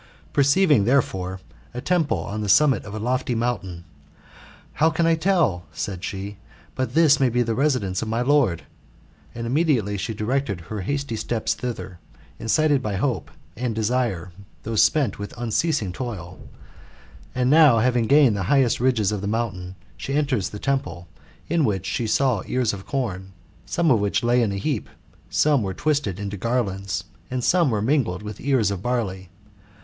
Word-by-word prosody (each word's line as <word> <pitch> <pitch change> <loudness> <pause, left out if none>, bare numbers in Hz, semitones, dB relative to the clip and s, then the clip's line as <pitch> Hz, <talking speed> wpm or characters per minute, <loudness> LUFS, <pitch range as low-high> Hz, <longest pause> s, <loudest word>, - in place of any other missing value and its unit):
Perceiving, 140 - +4
therefore, 95 -8 0 0.4
a - - -3
temple 155 - +1
on 100 +6 -4
the 105 - -3
summit 135 +1 +4
of 100 - -7
a - - -4
lofty 125 +2 -1
mountain, 95 -8 -3 0.5
" - - -22
How 160 - +6
can 165 +1 0
I 165 - +4
tell," 160 - +1
said 95 -3 -5
she, 100 +1 -5 0.2
'' - - -28
but 130 +2 -3
this 155 -3 +5
may 135 -2 +3
be 120 +1 +1
the 115 -1 -1
residence 125 -9 0
of 115 - -3
my 115 +2 -1
lord; 130 - +2 0.3
" - - -30
and 115 0 -4
immediately 120 - +1
she 110 +3 -3
directed 110 -2 -1
her 100 +5 -6
hasty 140 +3 -2
steps 110 0 -1
thither, 95 -8 -6 0.4
incited 145 +4 +2
by 105 -4 -3
hope 125 +5 -1 0.3
and 120 -1 -2
desire, 110 -6 -1 0.3
though 115 +1 -4
spent 125 -1 +2
with 100 +3 -7
unceasing 120 - 0
toil 95 -7 -6 1.0
And 125 +1 +2
now, 150 -6 +7
having 120 0 +2
gained 140 -5 +5
the 100 - -2
highest 135 -4 +3
ridges 120 -5 +2
of 105 -2 -3
the 100 - -3
mountain, 100 -5 -3 0.2
she 135 - -4
enters 140 -9 0
the 105 - -7
temple, 105 -9 -2 0.4
in 165 0 +1
which 95 -6 0
she 115 +4 -2
saw 125 -2 +2
ears 125 -4 0
of 95 -1 -8
corn, 95 -9 -3 0.3
some 170 -3 +1
of 115 - +4
which 100 +4 0
lay 120 +1 +3
in 110 -4 +1
a 100 - -3
heap, 115 +3 -2 0.4
some 145 -4 +3
were 95 -3 -3
twisted, 145 - -1
into 100 0 -4
garlands, 100 -3 -2 0.3
and 125 -1 -3
some 170 -1 +3
were 105 -3 0
mingled 110 - 0
with 105 0 -7
ears 130 -7 +2
of 95 -3 -4
barley. 100 -6 -2
115 Hz, 175 wpm, -23 LUFS, 100-135 Hz, 1.0 s, now